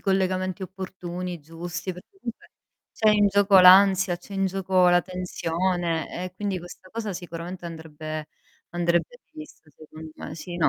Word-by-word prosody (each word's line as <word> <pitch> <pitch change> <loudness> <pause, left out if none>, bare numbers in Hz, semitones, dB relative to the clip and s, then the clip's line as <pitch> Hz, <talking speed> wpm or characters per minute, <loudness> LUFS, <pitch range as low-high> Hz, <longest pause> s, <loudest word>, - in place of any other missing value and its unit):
collegamenti 185 -1 0
opportuni, 180 -2 -6
giusti, 165 +3 -6
perché 180 +2 -13
comunque 235 -10 -8 0.4
c'è 215 -1 +3
in 205 -1 +4
gioco 200 -1 +5
l'ansia, 190 -1 +7
c'è 195 +2 -11
in 195 0 +1
gioco 185 -1 +2
la 175 - +5
tensione 175 -1 -2
e 180 0 -7
quindi 195 -1 -2
questa 180 +2 -12
cosa 220 -3 -4
sicuramente 175 +1 -7
andrebbe 155 -1 -7 0.4
andrebbe 175 - 0
rivista, 305 - -12
secondo 155 +2 -12
me. - - -7
Sì. 175 +2 -7
No. 165 - +3
180 Hz, 145 wpm, -25 LUFS, 170-190 Hz, 0.4 s, l'ansia